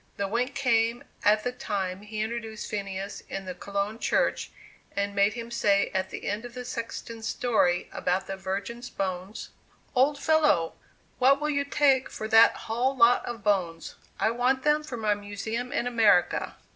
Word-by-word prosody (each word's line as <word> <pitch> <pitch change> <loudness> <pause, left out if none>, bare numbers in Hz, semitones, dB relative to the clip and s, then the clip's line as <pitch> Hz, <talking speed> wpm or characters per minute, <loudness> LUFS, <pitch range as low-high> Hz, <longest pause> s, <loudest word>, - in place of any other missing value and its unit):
The 200 - -1
wink 245 +6 -1
came 235 -3 +1 0.2
at 215 +1 +4
the 245 - -1
time 195 -6 -3
he 210 +1 -5
introduced 220 -1 -4
Phineas 200 -1 -4
in 195 0 -5
the 185 - -5
Cologne 200 +4 -3
Church, - - +1 0.5
and 200 0 -1
made 200 +1 +3
him 235 -1 -7
say 200 -4 +2
at 190 -1 -1
the - - -6
end 205 +3 -2
of 245 0 -9
the 250 0 -6
sexton's 230 -1 -5
story 195 -9 +1
about 185 +2 -1
the 195 - -4
Virgins' 200 +6 -5
bones: 190 +1 -4 0.4
"Old 275 +3 +3
fellow, 300 - +3 0.5
what 270 +2 +5
will 300 0 0
you 280 -1 +1
take 275 -2 +3
for 215 - -5
that 225 0 +7
hull 250 +4 0
lot 235 0 +5
of 240 -1 -6
bones? 175 -5 0 0.3
I 220 - +2
want 250 +2 +1
them 300 0 +3
for 255 -5 -6
my 215 -2 +1
Museum 205 +4 -5
in - - -1
America!" 220 -7 +3
225 Hz, 170 wpm, -27 LUFS, 200-245 Hz, 0.5 s, that